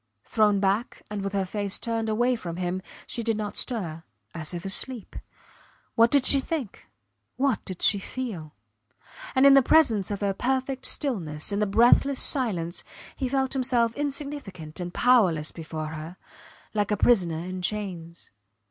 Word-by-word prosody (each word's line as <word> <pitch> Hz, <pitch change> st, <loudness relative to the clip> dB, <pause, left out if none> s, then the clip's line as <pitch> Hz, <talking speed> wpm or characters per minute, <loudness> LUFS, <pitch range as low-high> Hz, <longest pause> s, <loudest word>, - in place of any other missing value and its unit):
Thrown 210 Hz, -2 st, +2 dB
back 200 Hz, +5 st, -1 dB
and 210 Hz, -1 st, -3 dB
with 195 Hz, 0 st, -4 dB
her 195 Hz, -1 st, 0 dB
face 200 Hz, +1 st, -2 dB
turned 225 Hz, -1 st, -2 dB
away 240 Hz, +3 st, +2 dB
from 175 Hz, -7 st, -6 dB
him, 180 Hz, +1 st, -2 dB, 0.2 s
she 235 Hz, -, -3 dB
did 225 Hz, -1 st, 0 dB
not 210 Hz, -1 st, -4 dB
stir 175 Hz, -10 st, -2 dB, 0.3 s
as 155 Hz, -2 st, -5 dB
if 175 Hz, 0 st, -6 dB
asleep. 225 Hz, +4 st, 0 dB, 0.8 s
What 230 Hz, +1 st, +5 dB
did 275 Hz, 0 st, +3 dB
she 275 Hz, -, +6 dB
think? 270 Hz, -, -5 dB, 0.5 s
What 265 Hz, -4 st, 0 dB
did 185 Hz, -2 st, -6 dB
she 205 Hz, -, +4 dB
feel? 195 Hz, -9 st, -6 dB, 0.8 s
And 260 Hz, +1 st, +5 dB
in 280 Hz, -, +9 dB
the 275 Hz, -, +8 dB
presence 240 Hz, -, +3 dB
of 205 Hz, -1 st, -4 dB
her 200 Hz, -1 st, +1 dB
perfect 260 Hz, +4 st, -1 dB
stillness, 175 Hz, -, -1 dB
in 200 Hz, -, -1 dB
the 210 Hz, -, +1 dB
breathless 240 Hz, +6 st, +4 dB
silence, 185 Hz, -, -1 dB, 0.3 s
he 260 Hz, -3 st, -2 dB
felt 265 Hz, 0 st, 0 dB
himself 245 Hz, -3 st, +1 dB
insignificant 275 Hz, -, -5 dB
and 175 Hz, -1 st, -4 dB
powerless 185 Hz, -11 st, +3 dB
before 155 Hz, -1 st, -6 dB
her, 160 Hz, +3 st, -8 dB, 0.6 s
like 205 Hz, -2 st, 0 dB
a 210 Hz, -, +1 dB
prisoner 180 Hz, -9 st, +3 dB
in 185 Hz, +2 st, -5 dB
chains. 180 Hz, -4 st, -5 dB
210 Hz, 160 wpm, -26 LUFS, 180-250 Hz, 0.8 s, in